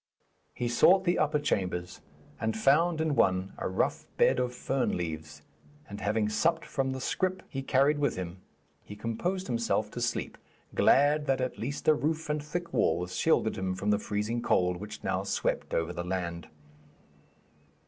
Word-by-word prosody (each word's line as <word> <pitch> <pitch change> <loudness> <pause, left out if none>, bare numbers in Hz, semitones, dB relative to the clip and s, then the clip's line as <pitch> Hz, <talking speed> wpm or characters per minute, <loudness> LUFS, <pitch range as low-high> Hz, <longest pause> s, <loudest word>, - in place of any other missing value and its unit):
He 120 - -2
sought 180 +11 +5
the 175 -1 +1
upper 150 0 +2
chambers, 90 -9 -2 0.4
and 110 0 -1
found 155 +8 +3
in 160 -2 +1
one 95 -2 +2
a - - -2
rough 95 - -1
bed - - +4
of 125 -1 0
fern 135 +1 -1
leaves, 80 -3 -5 0.4
and, 100 +1 -8
having 105 +1 +1
supped 160 +10 +1
from 135 -1 -1
the 130 0 -3
scrip 185 +7 -1
he 135 - -4
carried 140 +2 +3
with 145 - +1
him, 90 0 -6 0.4
he 105 - -10
composed 175 - -2
himself 115 -3 0
to 120 - -5
sleep, 120 -1 -2 0.3
glad 145 +2 +4
that 135 0 +2
at 130 0 -3
least 140 +5 -4
a 155 - +8
roof 155 +1 -1
and 150 -1 -2
thick 170 +3 -5
walls 90 +3 +1
shielded - - +2
him 95 -1 -1
from 100 +3 0
the 105 - +2
freezing 105 +3 -2
cold 90 -5 +2
which 105 +3 -8
now 95 0 0
swept 100 - -1
over 80 +1 -1
the 85 0 -4
land. 85 -2 -3
115 Hz, 170 wpm, -29 LUFS, 95-145 Hz, 0.4 s, a